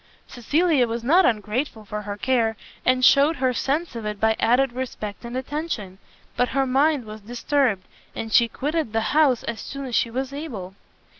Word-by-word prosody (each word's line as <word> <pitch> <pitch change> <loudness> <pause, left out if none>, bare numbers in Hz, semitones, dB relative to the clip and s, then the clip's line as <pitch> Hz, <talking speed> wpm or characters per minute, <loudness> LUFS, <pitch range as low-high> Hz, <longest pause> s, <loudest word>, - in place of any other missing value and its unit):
Cecilia 290 +2 +1
was 230 0 -4
not 340 +9 +5
ungrateful 220 +1 -2
for 210 +1 -5
her 205 0 -6
care, 230 -3 +1 0.3
and 255 0 +3
shewed 285 +4 +5
her 255 -2 +1
sense 285 +4 -1
of 230 - -5
it 210 -1 -4
by 220 +1 +3
added 245 +2 +3
respect 240 -5 -5
and 240 +1 -5
attention; 260 - -4 0.4
but 245 - +1
her 270 0 +1
mind 275 0 +2
was 215 0 -9
disturbed, 240 -2 0 0.3
and 225 -1 -5
she 235 - +6
quitted 295 0 -2
the 225 - +1
house 290 -6 +4
as 230 -3 -4
soon 275 -1 -6
as 250 - -7
she 230 - +2
was 260 +3 -4
able. 230 - -6
250 Hz, 180 wpm, -23 LUFS, 220-275 Hz, 0.4 s, she